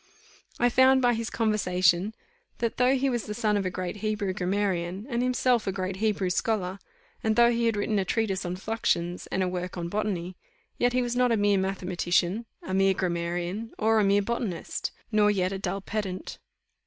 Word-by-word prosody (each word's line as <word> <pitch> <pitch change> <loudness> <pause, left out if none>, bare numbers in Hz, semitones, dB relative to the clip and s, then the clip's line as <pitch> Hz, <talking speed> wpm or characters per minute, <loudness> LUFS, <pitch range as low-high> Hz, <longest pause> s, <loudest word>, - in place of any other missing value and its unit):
I 245 - +4
found 260 +2 +5
by 245 0 +4
his 230 0 -3
conversation, 185 -3 +1 0.4
that 230 -1 -2
though 250 +2 +4
he 275 +1 +1
was 240 -4 -1
the 210 - -4
son 215 -2 +1
of 195 -2 0
a - - 0
great 180 +2 -4
Hebrew 210 -2 -1
grammarian, 190 0 -1
and 240 -2 0
himself 250 -2 +2
a - - +2
great 190 0 -3
Hebrew 200 -3 0
scholar, 190 -1 -1 0.4
and 220 -1 +2
though 235 +1 +6
he 235 0 +1
had 225 -2 +1
written 205 0 0
a - - +1
treatise 195 -2 0
on 180 0 -3
fluxions, 185 -4 -1
and 190 - +1
a - - 0
work 180 0 -4
on 170 -1 -3
botany, 185 -3 -2 0.4
yet 245 0 +2
he 250 0 +2
was 240 0 -2
not 250 -1 +3
a 230 - +3
mere 205 -1 +3
mathematician, 185 +2 0 0.2
a 185 - -5
mere 195 0 +3
grammarian, 175 +4 -2
or 220 0 +3
a - - +3
mere 200 +1 +3
botanist, 220 -5 -3 0.2
nor 210 -1 +4
yet 185 -2 +1
a 195 - -3
dull 195 0 -3
pedant. 195 -2 -4
205 Hz, 195 wpm, -27 LUFS, 185-225 Hz, 0.4 s, though